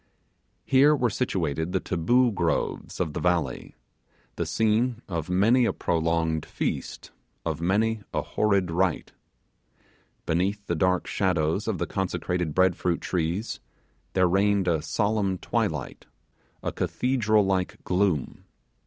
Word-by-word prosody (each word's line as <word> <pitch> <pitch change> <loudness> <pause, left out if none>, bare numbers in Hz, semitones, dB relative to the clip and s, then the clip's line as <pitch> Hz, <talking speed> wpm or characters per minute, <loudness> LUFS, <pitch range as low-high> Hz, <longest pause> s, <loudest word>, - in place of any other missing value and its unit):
Here 140 +3 +5
were 125 -5 +1
situated 85 - -1
the - - +2
Taboo 120 +9 +2
groves 85 -5 -2
of 80 -5 -1
the - - -3
valley 85 -7 -1 0.6
the - - -2
scene 115 +2 +1
of 85 -3 -4
many 110 +8 +4
a - - +1
prolonged 80 -1 0
feast, - - -4 0.3
of - - -2
many 105 +5 +1
a - - -1
horrid 100 -5 +1
rite. 90 0 0 1.1
Beneath 95 +5 0
the - - -1
dark 90 +2 +1
shadows 90 +1 0
of 110 -4 0
the 85 - -1
consecrated 90 -3 -2
bread 95 -1 +4
fruit 85 -2 -1
trees 90 +4 -2 0.5
there 95 -1 +3
reigned 100 +1 +2
a 80 -3 +2
solemn 100 +1 0
twilight - - -3 0.6
a - - -1
cathedral 110 -5 +1
like 95 -1 -1
gloom. 90 -6 0
95 Hz, 125 wpm, -26 LUFS, 85-105 Hz, 1.1 s, Here